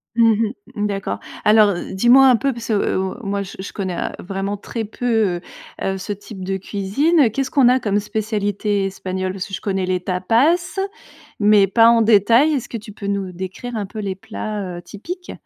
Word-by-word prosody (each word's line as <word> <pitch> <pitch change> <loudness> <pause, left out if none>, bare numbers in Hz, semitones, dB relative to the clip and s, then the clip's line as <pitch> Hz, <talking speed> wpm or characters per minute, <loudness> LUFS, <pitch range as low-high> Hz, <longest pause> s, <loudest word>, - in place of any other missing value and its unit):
Mmh 225 -1 +4 0.3
mh, 210 0 0
d'accord. 195 -1 -3 0.3
Alors, 210 -1 +6 0.2
dis-moi 245 +7 +6
un 255 - +6
peu, 275 +3 0
parce 235 -1 -8
que, - - +2
heu, 200 -2 +1 0.2
moi, 200 0 -2
je 190 - -10
je 190 - -6
connais, 185 -3 -3
heu, - - -2
vraiment 195 +2 -3
très 225 +3 -5
peu, 220 -5 0 0.4
heu, 195 0 -1
ce 190 +2 -6
type 200 -1 -10
de 190 +1 -2
cuisine. 225 - +2
Qu'est-ce 265 +2 -2
qu'on 265 -4 +5
a 255 +1 +4
comme 205 -3 0
spécialités 205 -1 -1
espagnoles? 185 -1 -3
Parce 185 -2 -5
que 195 - -13
je - - -4
connais 195 -3 -1
les 185 0 0
tapas, 225 - +2 0.8
mais 205 -1 +5
pas 230 +3 +5
en 235 -1 +5
détail, 230 +7 +5
est-ce 255 -5 -2
que 230 - -4
tu 210 -1 -11
peux 200 - -7
nous 200 -2 -2
décrire 190 +7 -6
un 210 -2 -2
peu 215 +3 -8
les 195 -2 -3
plats, 205 -3 -5
heu, - - -7
typiques? 350 - -8
205 Hz, 200 wpm, -20 LUFS, 195-230 Hz, 0.8 s, Alors